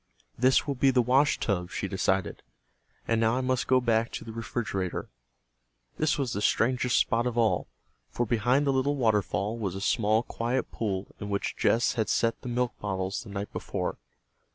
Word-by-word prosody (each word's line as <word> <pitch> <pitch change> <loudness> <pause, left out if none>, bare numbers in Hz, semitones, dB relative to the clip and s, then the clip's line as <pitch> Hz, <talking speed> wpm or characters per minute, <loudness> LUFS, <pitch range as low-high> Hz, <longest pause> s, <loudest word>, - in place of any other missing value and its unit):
"This 130 +2 +3
will 145 - -1
be 135 +1 +3
the 130 -1 +3
washtub," 115 -8 +2
she 95 - -3
decided. 95 0 -1 0.7
"And 115 -1 +2
now 115 +1 +3
I - - 0
must 130 -1 0
go 130 0 +5
back 115 -2 +1
to - - -5
the 115 - -7
refrigerator." 110 -5 -3 0.9
This 155 -1 +2
was 135 -4 -1
the 100 - -2
strangest 125 +3 +2
spot 115 +2 +2
of 120 -1 -3
all, 115 -2 +2 0.4
for 120 - -1
behind 120 +6 +2
the 140 - +2
little 135 +2 +1
waterfall 105 -2 0
was 95 -4 -2
a - - -4
small 110 +2 +2
quiet 120 +1 -2
pool 100 -4 -3
in 105 - -5
which 100 -1 -2
Jess 115 - +2
had 110 -3 -1
set 115 0 +1
the 125 - -6
milk 120 0 0
bottles 95 0 -2
the 110 - -11
night 100 +1 -5
before. - - -3
115 Hz, 180 wpm, -28 LUFS, 105-125 Hz, 0.9 s, go